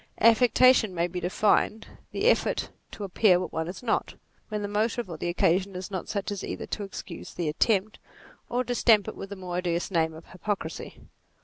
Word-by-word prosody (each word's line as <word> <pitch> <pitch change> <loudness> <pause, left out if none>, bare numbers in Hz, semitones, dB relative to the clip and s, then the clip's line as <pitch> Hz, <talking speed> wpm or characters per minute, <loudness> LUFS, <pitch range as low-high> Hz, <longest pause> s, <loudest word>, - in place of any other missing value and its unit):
Affectation 230 -2 +5
may 170 0 +1
be 180 +1 -4
defined, 210 +4 +1 0.3
the - - -2
effort - - +2 0.2
to 210 - -8
appear 190 -1 +4
what 185 - -5
one 160 0 -2
is 185 +7 -7
not, 230 - -1 0.3
when 210 -1 -3
the - - -1
motive 215 +2 0
or 160 - -5
the 175 - -2
occasion 185 +2 +1
is 185 +2 -6
not 185 -2 -4
such 200 -1 -2
as 200 -2 -4
either - - -4
to - - -4
excuse 195 -1 -8
the 170 -3 -2
attempt, 200 +6 +1 0.5
or 245 +1 0
to 245 - -2
stamp 225 -3 +4
ifc - - -5
with 195 - -8
the 200 - -6
more 180 -2 -5
odious 175 0 -1
name 160 -2 +1
of 160 - -12
hypocrisy. 200 +2 -5
195 Hz, 200 wpm, -27 LUFS, 175-215 Hz, 0.5 s, Affectation